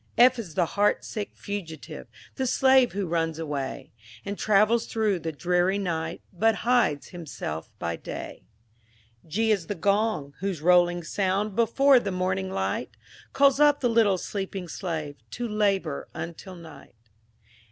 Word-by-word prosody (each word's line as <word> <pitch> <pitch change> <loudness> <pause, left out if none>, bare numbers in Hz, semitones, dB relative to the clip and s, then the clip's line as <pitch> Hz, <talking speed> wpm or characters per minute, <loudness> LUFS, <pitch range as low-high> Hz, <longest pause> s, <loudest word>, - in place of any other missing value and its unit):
F 250 +1 +6
is 175 -9 -7
the 175 - +3
heart 205 +5 +1
sick 210 -2 -4
Fugitive, 185 -6 -7 0.3
The 265 -1 -2
slave 260 0 +4
who 200 0 -2
runs 165 -2 -1
away, 145 -4 -4 0.3
And 200 0 -3
travels 215 +3 +3
through 215 -5 0
the 165 -1 -4
dreary 180 +5 +1
night, 165 -3 -3
But 225 +5 +2
hides 240 - +2
himself 145 - -6
by 85 0 -3
day. - - -7 0.9
G 220 +8 +1
is 190 -6 0
the 205 - -3
Gong, 200 -5 0
whose 190 -3 -2
rolling 175 +1 +4
sound, 195 +3 -1
Before 265 +4 +5
the 205 - -3
morning 185 - -1
light, 95 +4 -3 0.3
Calls 275 0 +4
up 295 -1 +5
the 245 - +2
little 225 -4 +3
sleeping 190 -1 -5
slave, 160 -5 -4 0.2
To 240 0 -3
labor 200 -8 0
until 170 +3 -7
night. 165 -7 -13
190 Hz, 145 wpm, -26 LUFS, 165-215 Hz, 0.9 s, F